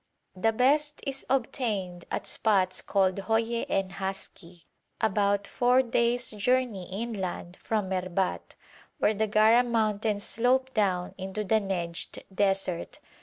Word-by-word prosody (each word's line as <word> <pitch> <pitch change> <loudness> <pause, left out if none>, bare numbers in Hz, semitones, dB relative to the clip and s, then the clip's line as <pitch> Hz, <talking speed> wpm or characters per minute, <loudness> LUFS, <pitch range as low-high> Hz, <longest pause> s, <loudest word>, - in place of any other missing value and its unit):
The 225 +5 +2
best 290 +6 +2
is 275 -1 -4
obtained 215 -9 -1
at - - -3
spots 190 -4 +1
called 190 -1 +1
Hoye 225 +3 0
and 195 -1 0
Haski, 190 -3 -6 0.4
about 200 -2 +1
four 250 +4 +3
days' 240 0 +1
journey 220 -3 0
inland 190 -4 -4
from 210 -4 -1
Merbat, 185 0 -2 0.4
where 215 - +2
the 215 +1 0
Gara 220 +3 +5
mountains 215 -3 0
slope 255 +4 +1
down 185 -5 0
into 190 +3 -4
the 220 +2 +3
Nejd 175 -4 -4
desert. 195 -3 0
210 Hz, 125 wpm, -28 LUFS, 190-235 Hz, 0.4 s, Gara